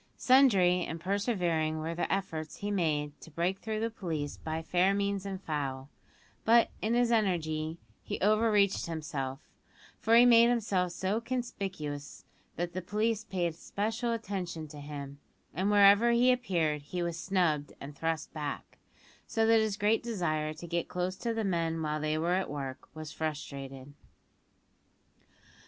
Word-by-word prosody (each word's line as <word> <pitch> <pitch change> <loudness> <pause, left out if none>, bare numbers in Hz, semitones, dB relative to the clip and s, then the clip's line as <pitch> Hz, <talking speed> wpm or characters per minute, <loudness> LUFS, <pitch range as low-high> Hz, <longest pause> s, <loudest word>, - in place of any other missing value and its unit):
Sundry 195 -10 +5
and 165 0 -5
persevering 175 -5 0
were 160 +1 -3
the 170 - -2
efforts 160 -5 -2
he 205 0 -3
made 150 -6 -1
to - - -11
break 175 +5 -1
through 220 -1 -3
the 230 0 -1
police 160 -9 -4
by 160 0 -4
fair 180 +4 +2
means 200 -1 -1
and 190 -1 -4
foul; 140 -6 -3 0.5
but, 230 +1 +5
in 225 +2 +1
his 240 -1 +3
energy, 165 -7 0 0.2
he - - -5
over 215 +3 +3
reached 200 -3 +2
himself, 145 -4 -4 0.6
for 225 - +3
he 240 +1 +8
made 235 -1 +7
himself 200 -7 +1
so 190 +5 -1
conspicuous 195 - -5 0.3
that 175 0 -3
the 185 - -3
police 215 +4 0
paid 175 -3 -1
special 220 +7 -2
attention 190 -8 -4
to 150 0 -10
him, 140 -1 -7 0.3
and 190 +6 0
wherever 205 +2 +6
he 240 +2 +5
appeared 170 - 0
he 175 +5 -4
was 170 -1 -3
snubbed 170 -7 0
and 145 +1 -8
thrust 160 +1 -2
back, 150 -3 -5 0.5
so 225 -1 +1
that 225 0 +5
his 215 -2 -1
great 210 +2 +2
desire 165 -9 -1
to 155 +3 -9
get 170 0 -2
close 180 +1 -2
to 235 +4 -3
the 225 -1 -1
men 165 -4 0
while 155 -1 -1
they 155 +1 0
were 170 +3 +1
at 190 +1 0
work 135 -2 -6
was 155 -1 -7
frustrated. 140 -3 -5
180 Hz, 160 wpm, -31 LUFS, 155-210 Hz, 0.6 s, he